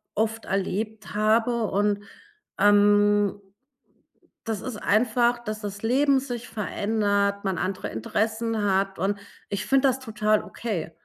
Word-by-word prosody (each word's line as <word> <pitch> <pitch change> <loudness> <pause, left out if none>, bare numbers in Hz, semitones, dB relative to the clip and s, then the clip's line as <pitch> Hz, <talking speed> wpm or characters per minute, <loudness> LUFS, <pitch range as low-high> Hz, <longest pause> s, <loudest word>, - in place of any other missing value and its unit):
oft 225 +1 -1
erlebt 210 +3 -3
habe. 225 +2 +2
Und, 205 0 0 0.6
ähm, 205 0 +4 1.1
das 220 -4 -3
ist 255 -4 -5
einfach, 240 +3 +2
dass 215 -2 -4
das 205 0 -6
Leben 270 +4 +3
sich 245 -3 -6
verändert, 205 -1 0
man 190 -3 -1
andere 185 0 -3
Interessen 220 - -1
hat 195 0 +1
und 200 +3 -1 0.3
ich 200 0 -3
finde 270 0 +4
das 260 +1 -1
total 215 -3 0
okay. 200 -9 -4
210 Hz, 125 wpm, -25 LUFS, 200-225 Hz, 1.1 s, ähm